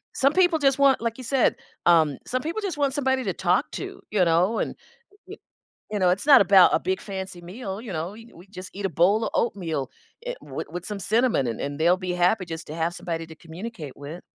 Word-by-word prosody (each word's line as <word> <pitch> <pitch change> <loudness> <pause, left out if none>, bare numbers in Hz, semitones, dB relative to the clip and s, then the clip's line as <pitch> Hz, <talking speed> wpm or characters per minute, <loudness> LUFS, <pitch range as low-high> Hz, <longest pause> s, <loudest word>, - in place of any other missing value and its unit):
Some 275 +2 +3
people 355 -2 +4
just 275 -3 +2
want, 275 -1 +5
like 230 -1 -2
you - - -7
said 260 +1 +2 0.3
um, 160 -5 +4
some 255 +1 -1
people 335 +9 -3
just 370 -7 -3
want 280 -2 +1
somebody 265 -2 +1
to 195 - -1
talk 180 +1 +1
to, - - -6
you 200 -4 +2
know, 175 +7 +2
and, - - -2 0.5
y - - -8 0.6
you 210 - -1
know, 185 -2 +3
it's 190 +8 -1
not 280 -5 +9
about 190 -1 +7
a - - +4
big 190 +1 -2
fancy 190 -3 -6
meal, 195 +3 -7
you 230 -4 -7
know, 165 +4 -4
e 225 +2 -14
we 175 +3 -15
just 185 -2 -9
eat 200 0 -6
a - - -1
bowl 195 +8 +3
of - - -2
oatmeal, 165 - -1 0.4
eh, - - -2
with - - -6
with 175 +1 -6
some 205 -2 -5
cinnamon 220 - +2
and 115 -2 -3
and 145 +2 -4
they'll 175 +3 +4
be 185 -1 -4
happy 180 +3 +2
just 165 -2 -7
to 155 - -6
have 165 +1 -1
somebody 165 -2 -4
to 160 - -12
communicate 165 - -8
with. 145 +5 -9
190 Hz, 235 wpm, -25 LUFS, 170-235 Hz, 0.6 s, not